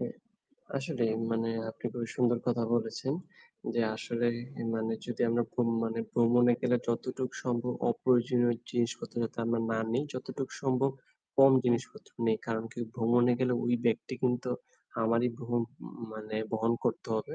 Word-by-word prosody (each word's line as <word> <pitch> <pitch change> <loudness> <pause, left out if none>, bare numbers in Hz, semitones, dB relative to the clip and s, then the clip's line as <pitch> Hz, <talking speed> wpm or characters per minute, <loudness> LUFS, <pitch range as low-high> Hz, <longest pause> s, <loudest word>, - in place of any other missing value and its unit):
হ্যা, 235 - -2 0.7
আসলেই 125 -6 0 0.2
মানে 115 0 0 0.2
আপনি - - -19
খুবই 120 -2 -4
সুন্দর 120 -1 +3
কথা 120 -1 +2
বলেছেন। 120 +4 -1 0.6
যে 120 - +2 0.2
আসলে 120 +1 -1 0.3
এ - - -2
মানে 110 0 -1
যদি 120 - -2
আমরা 120 +1 +2
ভ্রম 120 -1 +1 0.2
মানে 115 0 -2
ভ্রমণে 120 +1 +5
গেলে 125 0 +3
যতটুক 130 +2 -1
সম্ভব 125 0 0 0.2
অপ্রয়োজনীয় 120 0 +3 0.2
জিনিসপত্র 120 -1 -1
যাতে 115 - -4
আমরা 115 0 +1
না 110 - +1
নেই, 135 +4 +1
যতটুক 130 +1 -4
সম্ভব 135 0 +2 0.5
কম 135 0 +9
জিনিসপত্র 120 +1 -1 0.2
নেই। 110 -1 +4
কারণ 115 -1 -1
কি? - - -11 0.2
ভ্রমণে 120 +1 +4
গেলে 125 -1 +3
ওই 120 - +3
ব্যাগটি 120 +2 +1
কিন্তু 125 0 +1 0.5
আমারই 115 +2 +3
বহন 120 0 0 0.2
উম - - -9 0.2
মানে 110 0 -5 0.2
বহন 115 +1 +2
করতে - - -1
হবে। 110 - -4
120 Hz, 155 wpm, -31 LUFS, 115-125 Hz, 0.7 s, কম